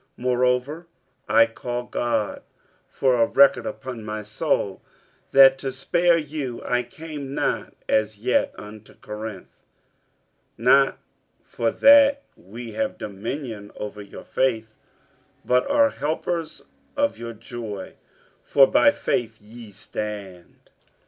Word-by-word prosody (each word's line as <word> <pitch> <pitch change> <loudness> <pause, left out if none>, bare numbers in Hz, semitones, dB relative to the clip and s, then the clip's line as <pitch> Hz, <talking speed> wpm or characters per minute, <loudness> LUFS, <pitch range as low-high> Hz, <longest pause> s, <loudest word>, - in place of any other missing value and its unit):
47:001:023 - - -41
Moreover 125 +6 0 0.4
I 115 +1 +6
call 120 +2 -5
God 120 -3 -2 0.5
for 125 -3 +1
a 115 - +4
record 140 0 +4
upon 130 -4 -7
my 105 0 -5
soul, 100 -2 -1 0.5
that 135 0 +7
to 135 - -3
spare 170 +6 +2
you 145 -6 -4
I 125 0 +1
came 145 +1 -8
not - - -2
as 110 -1 +1
yet 125 +5 +1
unto 105 0 -12
Corinth. 105 -2 -8 1.0
47:001:024 115 - -9
Not 135 +2 +5 0.4
for 115 - -2
that 280 - +6
we 115 +5 -10
have 275 -1 -2
dominion 105 +1 -6
over 105 0 -7
your 100 - -11
faith, 115 -4 -1 0.7
but 125 - +2
are 285 0 +4
helpers 160 +2 -3 0.3
of 285 0 0
your 115 0 -6
joy: 115 -3 -8 0.5
for 135 - +6
by 290 - +5
faith 115 - -2
ye 110 +2 -13
stand. 100 -2 -8
120 Hz, 120 wpm, -23 LUFS, 110-140 Hz, 1.0 s, that